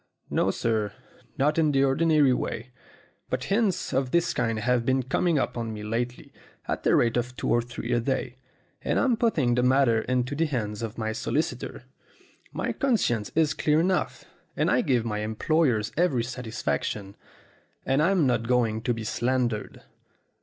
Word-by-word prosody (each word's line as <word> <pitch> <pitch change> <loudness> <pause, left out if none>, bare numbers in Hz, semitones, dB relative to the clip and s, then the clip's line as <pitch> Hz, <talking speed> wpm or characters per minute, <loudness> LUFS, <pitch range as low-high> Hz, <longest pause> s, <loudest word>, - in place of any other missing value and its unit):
"No, - - +2
sir 110 -3 -1 0.4
not 150 +4 +2
in 155 -2 +3
the 135 -1 +3
ordinary 145 0 +3
way. 130 - -4 0.6
But 130 0 -2
hints 205 -4 0
of 130 -1 +1
this 170 +4 +1
kind 115 -2 0
have 120 +2 +1
been 130 +1 +1
coming 165 +6 +1
up - - 0
to 120 - -3
me 110 -2 -6
lately 120 +3 -4 0.3
at - - -2
the - - +3
rate 115 0 +2
of 125 +1 -3
two - - -2
or 120 - +3
three 120 0 -6
a 120 - +3
day, 130 0 -2 0.4
and - - 0
I'm 255 -3 +3
putting 160 - +1
the 125 - +2
matter 125 -3 +3
into 125 +1 -1
the 160 +3 +1
hands 105 -6 -3
of 115 -1 -5
my 110 -1 -2
solicitor. 145 +7 -3 0.7
My - - -2
conscience 165 - 0
is 155 -2 +3
clear 150 0 +2
enough, 180 +2 0 0.3
and - - +2
I - - +3
give 120 -4 +1
my 105 -2 -2
employers 110 +1 +1
every 150 -8 +2
satisfaction, 110 - -3 0.7
and 135 +2 +2
I'm 175 -1 +3
not 120 -3 +1
going 115 -3 +1
to 120 +1 0
be 115 - -5
slandered. 120 -1 -1
125 Hz, 170 wpm, -26 LUFS, 115-150 Hz, 0.7 s, in